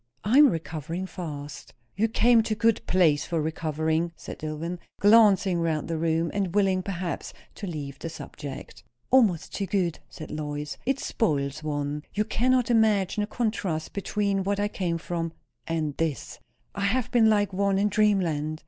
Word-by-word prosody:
"I 235 +8 +4
am 295 -2 +8
recovering 165 - -4
fast." 150 -6 -7 0.2
"You 215 +5 +2
came 230 +1 +4
to 220 0 -2
a - - -20
good 230 -1 +3
place 165 -6 +3
for 170 -2 -1
recovering," 160 +1 -1
said - - -9
Dillwyn, 155 +3 -4 0.2
glancing 200 -4 +5
round 160 -3 -1
the 165 -1 -2
room, 165 0 +1
and 195 -3 -1
willing, 190 -2 +3
perhaps, 180 -3 -4 0.2
to 200 - -7
leave 145 -5 -6
the 165 - -5
subject. 145 -3 -9 0.3
"Almost 220 -11 +3
too 195 - -2
good," 180 -4 0
said 155 - -9
Lois. 150 -1 -4
"It 270 0 +1
spoils 145 - -1
one. 145 -1 -2
You 210 +1 +1
cannot 250 +2 +2
imagine 215 -3 +3
the 205 - -1
contrast 200 -9 -2
between 200 0 -1
what 200 +1 -1
I 205 0 +1
came 175 -5 -2
from 165 -1 -4 0.3
and 155 -3 -1
this. 145 -6 -3 0.3
I 200 -1 -2
have 250 +4 0
been 225 -2 +5
like 205 -2 +2
one 200 0 +1
in 200 +1 +3
dreamland. 175 -8 +1
180 Hz, 165 wpm, -26 LUFS, 155-210 Hz, 0.3 s, am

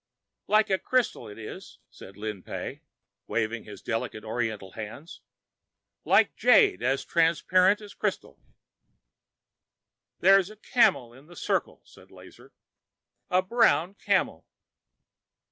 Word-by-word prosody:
"Like 215 0 +3
crystal 255 - 0
it 105 - -11
is," 110 -1 -10
said 95 - -14
Lin 105 -2 -5
Pey, - - -7 0.5
waving 115 0 -2
his 105 -2 -11
delicate 115 -1 -4
oriental 110 -4 -4
hands, 115 - -9 0.8
"like - - +3
jade 90 - +4
as 135 +3 0
transparent 180 +4 +3
as 205 -1 -11
crystal." - - -4 1.8
"There 195 +1 +6
is 190 0 -3
a 215 - -12
camel 140 - +2
in 135 +4 -17
the 175 - -15
circle," - - -2
said - - -19
Lazar, - - -16 0.8
"a 185 +1 +2
brown 190 -5 +2
camel." - - -1
140 Hz, 115 wpm, -27 LUFS, -, 1.8 s, There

